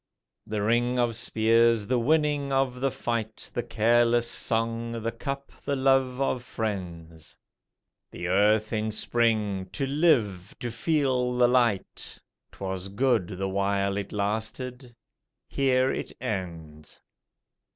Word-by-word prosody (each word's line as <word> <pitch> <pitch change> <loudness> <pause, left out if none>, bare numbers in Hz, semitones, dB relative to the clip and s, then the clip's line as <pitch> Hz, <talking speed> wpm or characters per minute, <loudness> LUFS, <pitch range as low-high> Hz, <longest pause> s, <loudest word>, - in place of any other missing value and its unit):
The 105 -1 -2
ring 120 +3 +2
of 120 -2 +1
spears, 115 0 +3
the 125 +3 +1
winning 145 +1 +1
of 135 -2 0
the 135 - +2
fight, 115 -4 -4
The 120 - -1
careless 120 +1 +2
song, 115 0 -2
the 115 - -1
cup, 135 +4 -5
the 140 - -1
love 135 -1 +2
of 130 -2 0
friends, 85 -8 -5 0.7
The 90 - -6
earth 105 +4 +3
in 110 0 0
spring 105 -4 0
to 135 - -1
live, 130 - +1
to 120 - -4
feel 125 -1 0
the 125 0 +5
light 120 -5 0 0.3
'Twas 95 -1 -5
good 115 -2 +1
the 95 +1 -2
while 100 0 0
it 100 0 -4
lasted: 110 +5 -3 0.5
here 130 -1 +2
it - - -4
ends. 85 - -6
115 Hz, 125 wpm, -27 LUFS, 100-125 Hz, 0.7 s, the